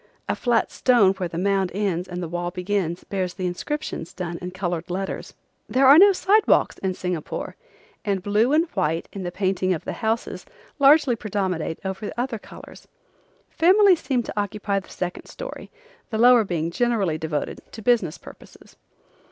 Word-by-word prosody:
A - - 0
flat 240 -2 +1
stone 230 -7 +4
where 185 -3 -4
the 165 - -6
mound 195 0 +1
ends 190 -3 -1
and 180 0 -5
the - - -3
wall 175 +1 -3
begins 180 -1 -2
bears 185 -2 -3
the 185 - -4
inscriptions 180 - -4
done 175 -2 -5
in 180 - -4
colored 175 -2 -4
letters. 190 +2 -4 0.3
There 265 +1 +3
are 280 +4 +9
no 400 +2 +8
sidewalks 400 +3 +3
in 190 -1 -2
Singapore, 180 -4 -4 0.5
and 195 -3 -1
blue 210 +5 +2
and 315 +3 +4
white 165 -4 -1
in 195 - -6
the 175 -1 -4
painting 185 0 0
of 160 - -9
the - - -3
houses 225 0 -2 0.4
largely 280 -2 +5
predominate 190 -7 -2
over 190 +2 -4
other 240 -2 -2
colors. - - -13 0.6
Families 370 +1 +5
seem 250 -4 0
to - - -7
occupy 205 -1 -1
the 190 - -16
second 180 -1 -5
story, - - -8 0.4
the 220 - -2
lower 240 0 +6
being 170 -4 -2
generally 200 -7 0
devoted 155 -2 -3
to 220 - -10
business 220 -10 +2
purposes. - - -16
195 Hz, 170 wpm, -23 LUFS, 180-240 Hz, 0.6 s, are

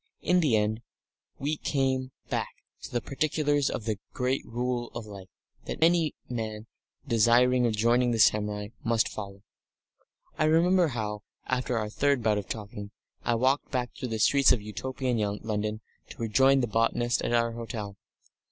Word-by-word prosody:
In 180 0 +3
the 145 -10 +3
end 105 +2 0 0.6
we 150 +3 -2
came 130 -2 0 0.2
back - - -3 0.3
to - - -8
the 120 - -1
particulars 145 0 0
of 110 - -4
this 110 -3 -1 0.2
great 130 +1 0
Rule 120 0 -2
of 120 -2 -5
Life 100 -3 -10 0.4
that - - -3
any 165 -2 +3
man 110 -3 -4 0.4
desiring 120 +1 +4
of 110 - 0
joining 120 +3 +3
the 115 - 0
samurai 105 -1 +2
must 115 -1 +2
follow. 100 -1 -8 1.0
I 155 - +3
remember 170 +3 +4
how, 105 -5 -3 0.2
after 125 -1 -1
our 110 -1 -1
third 140 0 +1
bout 105 -2 +2
of 100 - -9
talking, 105 -1 -6 0.3
I 120 - +1
walked 130 +4 +1
back 125 -2 -2
through 130 - -5
the 110 - -2
streets 140 +5 +5
of 125 - +3
Utopian 125 +3 -3 0.2
London 110 0 -2 0.3
to - - -11
rejoin 130 +4 +3
the 120 - 0
botanist 115 +2 +1
at - - -2
our 115 -1 +2
hotel. 115 -3 -6
120 Hz, 160 wpm, -28 LUFS, 110-130 Hz, 1.0 s, streets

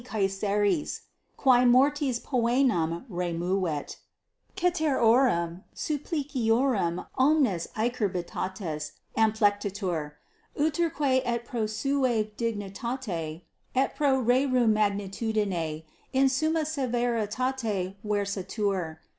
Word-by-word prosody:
Caesaris, 205 - 0 0.4
qui 250 -2 +5
mortis 260 +1 +3
poenam 235 - +1
removet, 175 - -2 0.6
ceterorum 255 - +2
suppliciorum 260 - 0
omnes 260 - +3
acerbitates 190 -7 -2 0.2
amplectitur. 205 -7 +1 0.5
Uterque 300 -4 +1
et 235 -1 -2
pro 230 -3 -2
sua 245 +1 +1
dignitate 205 -6 -4 0.3
et 265 +1 +1
pro 275 -3 +2
rerum 250 -1 +3
magnitudine 200 -5 -1 0.3
in 270 0 +4
summa 315 +5 +1
severitate 240 -6 -1
versatur. 200 -4 -2
225 Hz, 70 wpm, -27 LUFS, 195-260 Hz, 0.6 s, qui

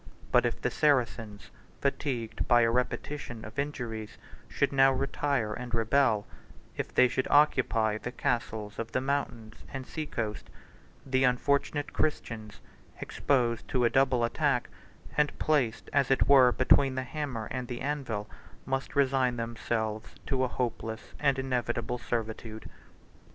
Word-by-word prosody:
But - - +5
if - - -4
the - - -1
Saracens, 115 -7 0 0.3
fatigued 130 -5 -2
by 120 0 +6
a 115 0 +3
repetition 125 -1 -3
of 110 +5 -7
injuries, 120 -7 -4 0.3
should 140 - 0
now 135 0 +6
retire 135 -4 -1
and 120 +1 -4
rebel; 115 -2 +2 0.5
if - - -4
they 125 - +5
should 130 +1 -1
occupy 115 -7 +3
the 125 - -5
castles 110 -4 -2
of 115 0 -5
the - - +2
mountains 130 -5 -2 0.2
and 135 -2 -5
sea 155 +2 -5
coast, 110 -7 -4 0.6
the 130 -1 +1
unfortunate 140 +3 +1
Christians, 115 -8 -2 0.4
exposed 120 -4 0
to 125 -2 +1
a 120 - +3
double 130 -3 +3
attack, 125 +1 +1 0.5
and 150 -1 +2
placed 135 -7 +1
as 140 -3 +3
it 135 - +3
were 130 -3 +7
between 130 +1 +4
the 130 - -1
hammer 130 -5 -4
and 125 -1 -3
the 120 0 -5
anvil, 130 -8 -3 0.4
must 135 0 -3
resign 135 -3 +2
themselves 115 -1 -3
to 130 -2 +1
hopeless 115 -3 -4
and 140 -2 +2
inevitable 125 -2 -1
servitude." 110 -2 -4
125 Hz, 140 wpm, -29 LUFS, 115-135 Hz, 0.6 s, were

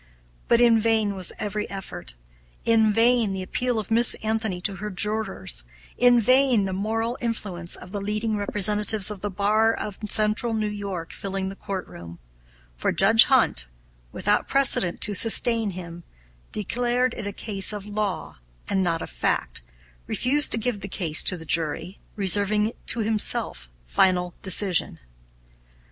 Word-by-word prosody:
But 235 - +3
in 235 -2 +4
vain 220 -2 0
was 185 -2 0
every 210 0 -4
effort; 195 - -8 0.5
in 220 -2 +3
vain 230 -1 +2
the 190 -1 -5
appeal 245 +5 -2
of 215 0 -5
Miss 230 +1 +6
Anthony 220 -4 -2
to 195 +1 -4
her 210 +4 -6
jurors; 195 - -2 0.3
in 245 -1 +4
vain 255 -2 +3
the 190 - -4
moral 225 +5 -3
influence 195 -7 -4
of 180 - -12
the 205 -1 -5
leading 215 +2 -2
representatives 210 0 +3
of 200 -3 -9
the 205 - -3
bar 210 +3 +1
of 210 -3 -6
Central 215 +2 +1
New 215 -1 -2
York 200 -5 -6
filling 195 -1 -5
the 195 - -9
courtroom, 85 - -8 0.6
for - - -2
Judge - - +6
Hunt, - - +2 0.4
without - - -1
precedent 270 -10 +4
to 210 - 0
sustain 225 +1 +4
him, 175 -2 -9 0.5
declaring 245 +4 -1
it 210 - -6
a - - -4
case 200 -1 0
of 205 -2 -7
law 205 - -4 0.3
and 195 - 0
not 170 -3 -2
of - - -8
fact, - - -2 0.5
refused 290 +4 +2
to - - +4
give 230 -1 -3
the 200 - -7
case 165 -5 +3
to 180 - 0
the 165 - -12
jury, 165 +4 -2 0.2
reserving 205 +2 +1 0.2
to 230 - +2
himself 210 - -1 0.2
final 180 - +1
decision. 190 -1 +1
205 Hz, 155 wpm, -23 LUFS, 185-225 Hz, 0.6 s, Miss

